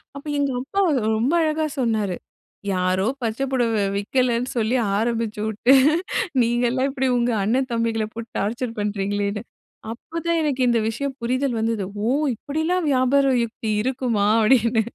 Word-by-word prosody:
அப்ப 280 - -9
எங்க 280 -1 +1
அப்பா 390 +10 -1 0.4
ரொம்ப 245 +7 +1
அழகா 310 0 0
சொன்னாரு. 215 -6 0 0.6
யாரோ 185 +1 +1 0.2
பச்சை 230 +3 -2
பொடவை 230 -5 +1
விக்கலன்னு 245 +3 0
சொல்லி 230 +3 +1 0.2
ஆரம்பிச்சு 225 -1 -1
வுட்டு, 220 +5 +3 0.7
நீங்கல்லாம் 240 +3 +1
இப்படி 265 -1 -1
உங்க 240 0 +1
அண்ணன் 255 +5 0
தம்பிகள 230 -1 0
போட்டு 230 0 -7
டார்ச்சர் 230 +3 -3
பண்ணுறீங்களேன்னு. 205 0 -2 0.5
அப்பதான் 335 +7 -3
எனக்கு 275 -3 -1
இந்த 235 -1 +3
விஷயம் 270 +4 -4
புரிதல் 255 0 0
வந்தது. 225 -2 -1 0.2
"ஓ! - - +1 0.3
இப்படிலாம் 315 +7 -1
வியாபார 270 +2 +3 0.2
யுக்தி 220 -1 -4
இருக்குமா?" 245 -5 0
அப்படீன்னு 230 0 +3
235 Hz, 130 wpm, -22 LUFS, 220-265 Hz, 0.7 s, வுட்டு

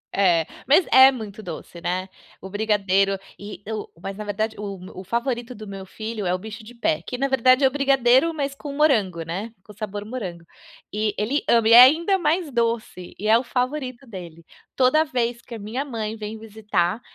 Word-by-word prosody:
É, 175 -5 +3 0.2
mas 300 +6 +5
é 260 +1 +9
muito 220 -4 -8
doce, 170 0 -8
né. 185 +2 -2 0.3
O 190 - -8
brigadeiro, 195 -2 +1 0.2
e 205 +1 -9
o 215 -1 -4
mas 195 +1 -5
na 210 - -6
verdade 215 +2 -2
o 200 -1 -5 0.2
o - - -11
favorito 235 +4 -2
do 215 -2 -10
meu 195 -1 -7
filho 215 +1 -6
é 180 - +1
o - - 0
bicho 220 +3 -9
de 225 +3 -12
pé, 310 +7 0
que 250 - -5
na 275 +2 +1
verdade 260 0 +4
é - - +7
o - - -1
brigadeiro 270 +2 +3
mas 280 -3 -3
com 285 0 -7
morango, 225 - +2
né, 185 +8 -5
com 210 - -14
sabor 205 0 -6
morango. 190 -8 -6 0.5
E 210 0 0
ele 250 +8 0
ama 230 -2 +4
e 230 - +6
é 240 - +12
ainda 335 +9 +5
mais 335 -1 0
doce, 230 -6 -2
e 210 - -3
é 220 +1 +6
o 240 - -2
favorito 255 +1 -3
dele. 170 -6 -10 0.3
Toda 265 +4 +4
vez 240 -5 -2
que 235 - -9
a - - -8
minha 220 +6 -3
mãe 225 -6 -4
vem 215 0 -7
visitar, 210 -2 -2
220 Hz, 205 wpm, -23 LUFS, 200-255 Hz, 0.5 s, é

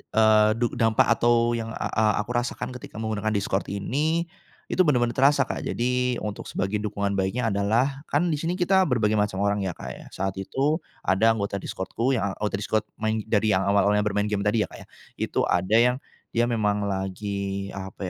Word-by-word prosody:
eee, 110 -1 +5
du 120 - +2
dampak 115 -1 +3
atau 120 0 +3
yang 115 -1 -4
a - - -3
a 110 - +1 0.2
aku 115 - -7
rasakan 120 +1 -2
ketika 120 -3 -9
menggunakan 110 -1 -2
Discord 100 -1 -1
ini, 150 - 0 0.5
itu, 185 - +3
benar-benar 120 -5 +3
terasa, 140 +1 +4
Kak. - - -4
Jadi, 125 +1 0
untuk 105 -1 -5
sebagai 100 +3 -2
dukungan 100 -1 -2
baiknya 115 +5 0
adalah 115 +8 0
kan 155 +5 +1
di 150 - -1
sini 170 +3 -1
kita 190 +1 +3
berbagai 110 -5 +1
macam 100 -1 0
orang 100 0 +1
ya, 90 - -3
Kak, 65 - -8
ya. - - -11
Saat 95 0 -2
itu, 140 - 0 0.2
ada 110 +4 +3
anggota 100 -1 -2
Discord-ku 115 +8 -2
yang 100 -4 -1
anggota 105 -1 -1
Discord 105 +2 -1
main 110 0 0
dari 110 0 +2
yang 95 0 +2
awal-awalnya 100 +1 +3
bermain 105 0 0
game 105 - 0
tadi 105 +1 +2
ya - - -17
Kak, - - -10
ya, - - -37 0.3
itu - - -1
ada 95 +5 +1
yang 125 +2 +4 0.3
dia 120 +1 +2
memang 105 -3 0
lagi, 100 0 -3
apa 95 0 -6
110 Hz, 190 wpm, -25 LUFS, 100-120 Hz, 0.5 s, eee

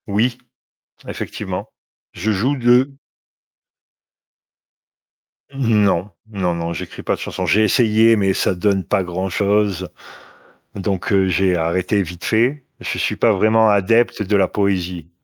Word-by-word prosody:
Oui, 115 +4 0 0.7
effectivement. - - -6 0.4
Je 110 +5 -2
joue 125 +8 0
de 125 +3 +3 2.6
Non, 105 -7 +1 0.2
non, 95 -5 -1
non, 85 0 -3
j'écris 80 - -8
pas - - 0
de - - -14
chanson. - - -4
J'ai 110 - +3
essayé, 115 0 +4
mais 95 -2 +1
ça 95 - 0
donne 95 +1 0
pas 95 - 0
grand-chose, 95 +1 -1 0.9
donc 95 -2 -3
heu, 95 -1 +3
j'ai 95 +1 +1
arrêté 90 +5 0
vite 90 0 -10
fait. 125 +5 +1
Je - - -4
suis - - -1
pas - - +3
vraiment 110 0 +3
adepte 110 +4 +2
de 105 0 0
la 95 -2 +3
poésie. 90 -5 -2
100 Hz, 130 wpm, -19 LUFS, 95-110 Hz, 2.6 s, essayé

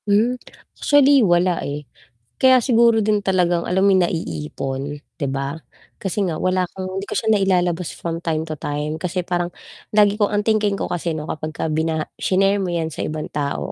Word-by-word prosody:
Hmm, 215 +5 +3 0.5
actually 285 -1 +5
wala 175 -3 +2
eh, 145 +1 -5 0.6
kaya 260 -1 +7
siguro 230 -2 +4
din 210 -1 +2
talagang 180 -3 +1
alam 190 +2 +2
mo 200 - +5
yung 185 - +4
naiipon 135 - -4 0.2
'di 145 - -2
ba? 140 +3 -3 0.4
Kasi 195 +1 -1
nga 165 -4 -3
wala 185 0 +1
kang 185 -1 -5
hindi 195 - -3
ko - - -6
siya 220 - 0
nailalabas 180 -4 +1
from 165 -1 -4
time 160 -2 -1
to 155 - -4
time, 150 +2 -3
kasi 180 +2 -2
parang 175 0 -2 0.4
lagi 205 -1 +4
kong 210 -1 +1
ang 205 - +2
thinking 215 -2 +2
ko - - -3
kasi 170 -1 -2
'no 155 -1 -4
kapag 155 0 -4
ka 160 - -3
binaha 160 0 0
shinare 195 +1 +2
mo 185 - -2
'yan 165 -2 -1
sa - - -3
ibang 155 0 -4
tao 145 -1 -2
180 Hz, 190 wpm, -21 LUFS, 155-200 Hz, 0.6 s, kaya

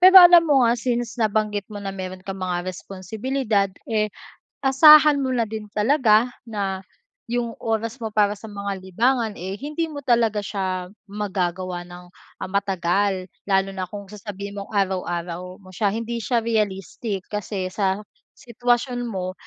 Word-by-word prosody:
pero 375 +1 +8
alam 350 -1 +9
mo 280 -5 +4
nga 235 0 +4
since 240 -1 -2
nabanggit 215 -2 0
mo 205 -1 -7
na 195 -1 -4
meron 185 -1 -7
kang 195 -1 -6
mga 180 -1 -2
responsibilidad, 205 +4 -2 0.2
eh, 215 -2 +1 0.6
asahan 300 +2 +8
mo 260 -1 -1
na 240 -2 +1
din 215 -1 -6
talaga 230 0 +4 0.2
na 195 -4 -3 0.4
yung 235 -1 -2
oras 225 +2 -2
mo 220 - -2
para 205 -1 +3
sa 220 - -10
mga 200 -1 -4
libangan, 225 +4 +1
eh, 190 +3 -5
hindi 300 +5 -2
mo 295 - -7
talaga 230 -3 +3
siya 185 -3 -2 0.2
magagawa 185 -3 -2
ng, 175 0 -12 0.4
ah, - - -2
matagal. 195 0 0 0.2
Lalo 195 0 +2
na 190 - -4
kung 200 +1 -8
sasabihin 200 -1 -7
mong 200 - -7
araw-araw 180 -2 -2
mo 185 -1 -15
siya, 205 +1 +1
hindi 230 +2 -3
siya 240 +2 +1
realistic, 205 -2 -2
kasi 205 -2 -3
sa 195 -1 0 0.4
sitwasyon 245 +1 -1
mo 185 -4 -3
205 Hz, 155 wpm, -23 LUFS, 190-235 Hz, 0.6 s, alam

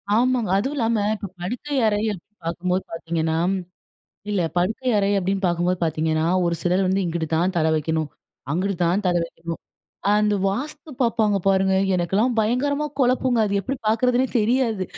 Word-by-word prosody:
ஆமாங்க. 245 -3 +2
அதுவும் 270 +7 -2
இல்லாம 230 -2 +1 0.2
இப்ப 205 -1 -6
படுக்கை 250 +9 -4
அறைய 215 +1 +1 0.4
பாக்கும்போது 180 +2 -1
பாத்தீங்கன்னா, 165 -1 -2 0.9
இல்ல 200 -3 +1 0.2
படுக்கை 220 +8 0
அறை 200 0 +2
அப்படீன்னு 195 +1 0
பாக்கும்போது 175 +1 0
பாத்தீங்கன்னா, 160 0 0 0.2
ஒரு 170 0 +1
சிலர் 180 +2 +2
வந்து 190 +1 +1
இங்குட்டு 165 -1 -2
தான் 180 +3 +1
தலை 160 0 +2
வைக்கணும், 155 0 -1 0.4
அங்குட்டு 190 +4 0
தான் 185 +5 +1
தலை 175 -1 +2
வைக்கணும். 165 0 -7 0.6
அந்த 210 0 +2
வாஸ்து 295 +8 -5
பாப்பாங்க 225 -4 +2
பாருங்க! 190 0 +3 0.2
எனக்குல்லாம் 195 +8 +1
பயங்கரமா 280 +7 +1
கொழப்புங்க 255 -1 +2
அது. 200 -1 -1
எப்படி 265 +8 -3
பாக்குறதுன்னே 250 +4 +2
தெரியாது. 225 -3 +1
195 Hz, 145 wpm, -23 LUFS, 175-235 Hz, 0.9 s, பாருங்க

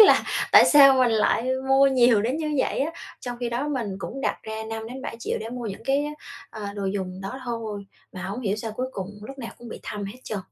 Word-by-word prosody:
là 425 - +8 0.3
tại - - +10
sao 275 -2 +8
mình 255 -2 +4
lại 225 +3 +2 0.2
mua 270 +1 +6
nhiều 245 -5 +5
đến 255 +6 0
như 305 -2 -2
vậy - - +1
á? 300 +4 +1 0.3
Trong 245 -1 -5
khi 240 - -1
đó 250 +5 -2
mình 230 -9 -2
cũng 270 +7 -6
đặt - - -1
ra 220 0 -5
5-7 225 +3 -5
triệu - - -2
để 220 - -5
mua 245 -2 -5
những 195 - -6
cái 275 +2 +2
á, 300 - -4 0.4
ờ, 210 -2 -6
đồ 200 -1 -4
dùng 190 -1 -3
đó 255 +8 -6
thôi, 220 -4 -4 0.3
mà 185 - -7
hổng 200 +6 -4
hiểu 205 -3 0
sao 220 0 -5
cuối 255 +3 -2
cùng 190 0 -5
lúc 270 +4 -9
nào 235 - -6
cũng 240 -1 -10
bị - - -8
thâm 205 -1 -5
hết 210 +6 -7
trơn. 215 - -3
235 Hz, 245 wpm, -25 LUFS, 210-265 Hz, 0.4 s, tại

